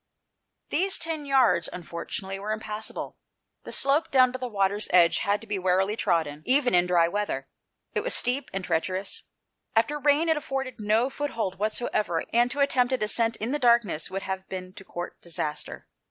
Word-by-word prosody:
These 380 +4 +2
ten 315 -3 -2
yards, 260 -10 +3
unfortunately, 180 +3 -6
were 210 +2 -4
im 215 - -1
passable. 215 0 -5 0.5
The - - -7
slope 280 +4 +2
down 255 -2 +4
to 255 - -4
the 255 - -3
water's 200 -1 0
edge 170 -2 +5
had 205 +1 +1
to - - -10
be 210 -3 -3
warily 190 +3 +1
trodden 160 -8 0
even 255 -2 +3
in 175 0 +4
dry 175 -2 +4
weather. 170 -8 -2 0.5
It - - +1
was - - +3
steep 255 +3 +2
and 190 -1 -4
treacherous. 185 +3 -1 0.5
After 260 +7 +2
rain 295 +3 +3
it 320 -1 +3
afforded 270 -3 -4
no 220 +5 +1
foothold 230 -10 -3
whatever, 215 -5 0
and 240 +1 +4
to 280 +3 -2
attempt 260 -2 +2
a - - +3
descent 230 +1 0
in 225 +4 -3
the 295 - 0
darkness 235 - +2
would 195 +1 -4
have 190 0 -5
been 185 -1 -6
to 195 - -11
court 175 -2 -7
disaster. 155 -3 -4
215 Hz, 185 wpm, -26 LUFS, 185-255 Hz, 0.5 s, edge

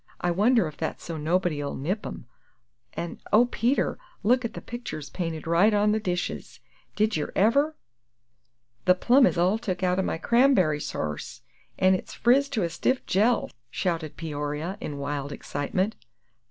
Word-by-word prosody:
I 175 - 0
wonder 220 +5 +3
if 155 - -9
that's 160 - -4
so 165 - -5
nobody 160 -1 0
'll 140 - -4
nip 185 +10 -2
'em; - - -8 0.7
an' 170 - -5
oh, 225 +3 +6
Peter, 245 +2 0 0.2
look 250 +5 +3
at 230 - -4
the - - -4
pictures 240 - -7
painted 165 -4 -4
right 175 +6 +4
on 205 +1 +3
ter - - +3
the 215 - +1
dishes. 180 -4 -3 0.4
Did 215 +1 +1
yer 150 - -3
ever!" 280 +10 +3 1.1
"The 180 - +6
plums 250 +7 +5
is - - -1
all 185 +5 +2
took 190 -5 -3
out 180 0 +2
o' - - +4
my 185 - -1
cramb'ry 195 - +3
sarse, 75 -1 -4 0.4
an' 185 0 +4
it's 185 - -3
friz 275 +4 +3
to 230 -8 -1
a 170 - 0
stiff 255 +9 0
jell!" 220 +5 +2 0.2
shouted 165 0 -2
Peoria, 150 +2 -3
in 145 - -5
wild 140 0 -3
excitement. 185 +10 -2
185 Hz, 170 wpm, -26 LUFS, 160-225 Hz, 1.1 s, oh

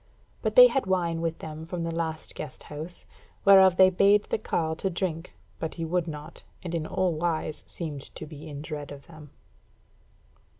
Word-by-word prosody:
But - - -1
they - - +11
had 270 - +1
wine 170 -3 0
with 165 -1 -2
them 155 0 -7
from 170 +1 -4
the 165 0 -2
last 160 -1 -3
guest 150 -4 -8
house, 155 +4 -7 0.4
whereof 190 -2 +7
they 185 0 +7
bade 200 +3 +4
the - - -2
carle 160 -6 -1
to 195 - -1
drink; 170 -2 -3 0.2
but 160 - -4
he 165 - -3
would 175 +1 0
not, 150 -1 -8 0.2
and 175 -2 -5
in 160 -2 -2
all 185 0 0
wise 155 -1 -2
seemed 150 -5 -6
to - - -6
be 155 0 -10
in 145 -1 -7
dread 150 -2 -6
of 140 -1 -10
them. 155 -3 -13
165 Hz, 185 wpm, -27 LUFS, 155-180 Hz, 0.4 s, they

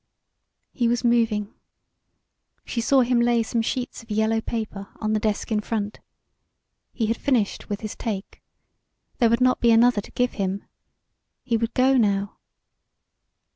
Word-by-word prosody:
He 240 -3 0
was 240 +1 0
moving. 225 -3 +1 1.1
She 235 - -2
saw 265 +3 +4
him 245 0 +2
lay 235 -1 +3
some 230 +1 -1
sheets 250 +3 -3
of 230 - -19
yellow 220 +1 +1
paper 215 -4 -5
on 215 -1 -1
the 215 - +2
desk 210 +2 -2
in 215 - +2
front. 210 -1 -3 0.9
He 230 - -1
had 225 +1 0
finished 240 -8 0
with 205 -1 -3
his 215 -2 -5
"take." 205 -4 -5 0.8
There 235 - +5
would 235 +2 +2
not 255 0 +3
be 235 - +3
another 230 -1 +5
to - - -14
give 250 0 +1
him. 195 +1 -2 0.8
He 240 -2 0
would 230 0 -1
go 260 +1 +4
now. 200 -3 0
225 Hz, 155 wpm, -24 LUFS, 210-240 Hz, 1.1 s, There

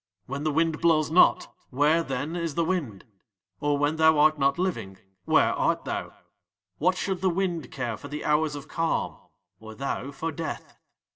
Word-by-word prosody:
"When 140 +2 -5
the 155 - +1
wind 160 +1 0
blows 155 -2 +3
not, 175 - +4 0.2
where, 150 +5 +3
then, 145 +2 -3
is 165 -4 -3
the 170 - +1
wind? 150 - -3 0.5
"Or 145 0 +1
when 145 +2 0
thou 160 -1 +5
art 155 0 +4
not 140 0 +2
living, 115 - -3 0.3
where - - +4
art - - 0
thou? - - -4 0.7
"What 180 +4 +2
should 190 -1 -2
the 190 - +3
wind 175 -2 -2
care 120 -5 -3
for - - -10
the 150 +1 -6
hours 150 0 +1
of 145 +1 -8
calm 165 0 -1 0.4
or 110 0 -11
thou 135 0 -3
for 160 +4 -4
death? 160 +1 -6
155 Hz, 180 wpm, -26 LUFS, 140-165 Hz, 0.7 s, thou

